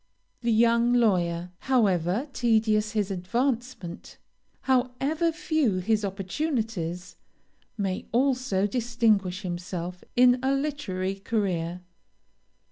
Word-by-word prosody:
"The 235 -1 +1
young 235 +2 +4
lawyer, 180 -7 +1
however 205 - +1
tedious 220 -3 +2
his 210 -2 0
advancement, 230 0 -3 0.4
however 270 +6 +1
few 315 - 0
his 210 +3 +1
opportunities, 195 - -3 0.6
may 195 -3 -2
also 250 -6 +1
distinguish 215 -5 +1
himself 175 0 -5
in 250 0 +5
a 265 +1 +2
literary 270 -11 -2
career. 180 -5 -2
215 Hz, 90 wpm, -26 LUFS, 185-250 Hz, 0.6 s, in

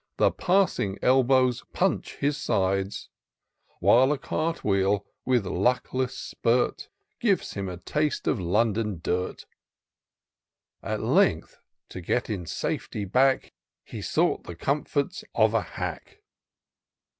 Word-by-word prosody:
The - - +4
passing 175 - +1
elbows 130 -1 +3
punch - - 0
his 145 +1 0
sides; 95 -7 -1 0.7
While 130 +4 +5
a 150 - +1
cart 165 +2 -2
wheel, 100 0 +1 0.2
with 125 -5 +2
luckless 125 +6 0
spirt, 120 +2 0 0.3
(rives - - +1
him 100 -1 -4
a 90 - -6
taste 150 - -1
of 125 - +1
London 105 +1 0
dirt: 90 +1 -2 1.4
At - - -3
length, - - +2 0.3
to 95 - -7
get 120 +7 -1
in 90 -6 -4
safety 105 +5 -3
back, 130 +7 +2 0.3
He - - -8
sought - - 0
the 85 - -7
comforts 145 - -1
of 110 -1 +4
a 115 - +3
hack. 80 - -7
115 Hz, 120 wpm, -26 LUFS, 95-135 Hz, 1.4 s, While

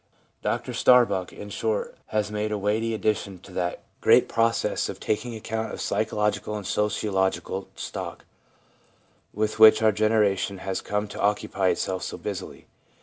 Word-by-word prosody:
Dr - - -2
Starbuck, 100 -8 +4
in 105 0 -9
short, 110 0 -2
has 105 -1 -1
made 105 0 -2
a 105 - 0
weighty 110 +3 0
addition 105 -3 -1
to 95 - -14
that 90 -1 -2 0.2
great - - +5
process 115 0 +1
of - - -6
taking 115 +2 -2
account 110 0 -4
of - - -6
psychological 105 0 -1
and 105 -2 -5
sociological 95 -2 -1
stock, - - -6 1.1
with 110 +1 -2
which 110 0 +8
our 110 - +6
generation 105 -2 +1
has 95 0 -3
come 105 +1 -2
to - - -6
occupy 100 -2 +1
itself 95 0 0
so - - -5
busily. - - -6
105 Hz, 145 wpm, -25 LUFS, 100-110 Hz, 1.1 s, which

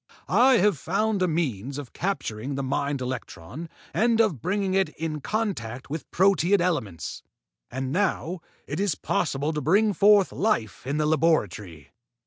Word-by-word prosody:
I 260 +1 +5
have 205 - +2
found 215 +3 0
a 185 - +3
means 140 - -2
of 145 -4 -8
capturing 140 - -3
the 140 - -2
mind 140 +1 -1
electron 125 - -6 0.2
and 225 +5 +2
of 200 - +2
bringing 195 +1 0
it 190 -4 +2
in 155 -2 -3
contact 135 - -3
with 155 0 -5
proteid 195 +1 +3
elements. 130 - -2 0.5
And 130 +1 -4
now 185 -1 0 0.3
it 145 +4 -4
is 200 -5 +1
possible 145 +4 -1
to 150 - -2
bring 205 +7 +3
forth 205 -1 +5
life 130 - -1
in 140 +2 -1
the 155 - +1
laboratory. 110 - 0
160 Hz, 150 wpm, -25 LUFS, 130-195 Hz, 0.5 s, I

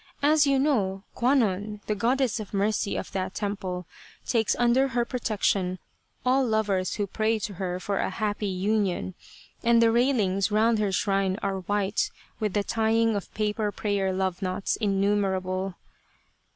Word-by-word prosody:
As 295 0 +5
you 275 -1 +3
know, 205 -9 +1
Kwannon, 215 -5 +1
the 215 - 0
Goddess 245 +3 +1
of 210 -1 -6
Mercy 205 0 0
of - - -5
that 190 0 -3
temple, 195 -3 -3 0.4
takes 225 -3 +1
under 245 +3 +3
her 240 -2 0
protection 200 -6 0 0.5
all 260 +2 +4
lovers 210 -5 0
who 205 - -1
pray 220 +3 0
to 210 -1 -4
her 180 -1 -2
for 200 +2 -2
a - - 0
happy 205 +1 -2
union, 190 -1 0 0.5
and 235 0 +5
the 230 -1 +5
railings 220 -6 +2
round 220 +1 +3
her 205 -2 +1
shrine 195 0 +1
are 195 -1 -1
white 205 +2 0 0.3
with 210 -3 -1
the 205 - +1
tying 225 +1 +2
of 200 - -4
paper 210 0 0
prayer 200 -2 -1
love 185 -1 -1
knots 185 +1 -1
innumerable. 195 -2 0
205 Hz, 150 wpm, -26 LUFS, 190-225 Hz, 0.5 s, As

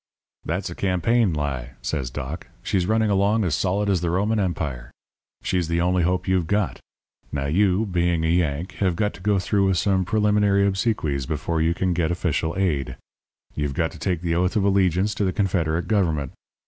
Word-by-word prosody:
"'That's 90 +2 -2
a - - -4
campaign 100 +4 +1
lie,' 70 -5 -3
says 65 -6 -2
Doc. 70 +4 -6 0.2
'She's 90 -2 0
running 110 0 +2
along 100 +3 +2
as 85 -5 0
solid 95 +9 0
as 95 -4 +1
the 85 - 0
Roman 105 +5 +1
Empire. 75 -10 -2 0.5
She's 90 -3 0
the 85 0 0
only 90 +1 +2
hope 90 +1 0
you've 95 -3 +1
got. 100 0 0 0.5
Now, 70 -1 -2
you, 95 +7 +2
being 85 -3 0
a - - +2
Yank, 85 +1 0
have 95 -4 +1
got 105 +4 0
to - - -13
go 105 +1 +2
through 100 +1 +1
with 95 -2 +2
some 95 0 +2
preliminary 105 0 +2
obsequies 95 - 0
before 80 -1 -1
you 85 +1 +2
can 90 0 0
get 85 -2 0
official 85 -2 -1
aid. 80 -9 -1 0.6
You've 75 -2 -2
got 80 +1 0
to - - -12
take 90 -4 -1
the 85 -2 -1
oath 90 +2 +1
of 105 - +2
allegiance 95 0 +2
to 105 - -2
the 95 - +1
Confederate 90 -4 0
Government. 80 -10 0
90 Hz, 190 wpm, -23 LUFS, 80-100 Hz, 0.6 s, running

